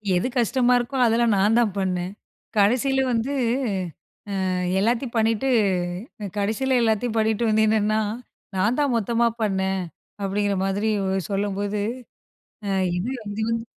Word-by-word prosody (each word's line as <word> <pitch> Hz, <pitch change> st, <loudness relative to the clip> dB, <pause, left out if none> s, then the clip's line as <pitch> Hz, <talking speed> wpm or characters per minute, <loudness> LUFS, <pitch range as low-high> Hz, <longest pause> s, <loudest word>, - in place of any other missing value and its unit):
எது 175 Hz, -, +1 dB
கஷ்டமா 245 Hz, +1 st, +3 dB
இருக்கோ 245 Hz, +3 st, -3 dB
அதெல்லாம் 230 Hz, 0 st, +3 dB
நான் 210 Hz, +4 st, +3 dB
தான் 220 Hz, -5 st, +2 dB
பண்ணேன். 180 Hz, -1 st, -1 dB, 0.5 s
கடைசியில 255 Hz, +6 st, +3 dB
வந்து, 235 Hz, +4 st, 0 dB, 1.2 s
ம் 180 Hz, 0 st, -1 dB
எல்லாத்தையும் 235 Hz, +4 st, 0 dB
பண்ணிட்டு 225 Hz, +3 st, +2 dB, 0.9 s
கடைசியில 235 Hz, +6 st, +1 dB
எல்லாத்தையும் 225 Hz, +1 st, +1 dB
பண்ணிட்டு 220 Hz, +1 st, +1 dB
வந்து 220 Hz, 0 st, +3 dB
நின்னா, 215 Hz, 0 st, +2 dB, 0.6 s
"நான் 210 Hz, +8 st, +1 dB
தான் 280 Hz, -4 st, +2 dB
மொத்தமா 235 Hz, +2 st, +1 dB, 0.2 s
பண்ணேன்" 190 Hz, -2 st, 0 dB, 0.4 s
அப்படிங்கிற 200 Hz, 0 st, 0 dB
மாதிரி 200 Hz, +3 st, 0 dB, 0.4 s
சொல்லும்போது, 200 Hz, +1 st, -1 dB, 0.9 s
அ -, -, -1 dB, 0.3 s
இது 190 Hz, +8 st, -2 dB, 0.2 s
இது 210 Hz, +2 st, -4 dB
வந்து 230 Hz, 0 st, -2 dB
220 Hz, 120 wpm, -24 LUFS, 200-235 Hz, 1.2 s, கஷ்டமா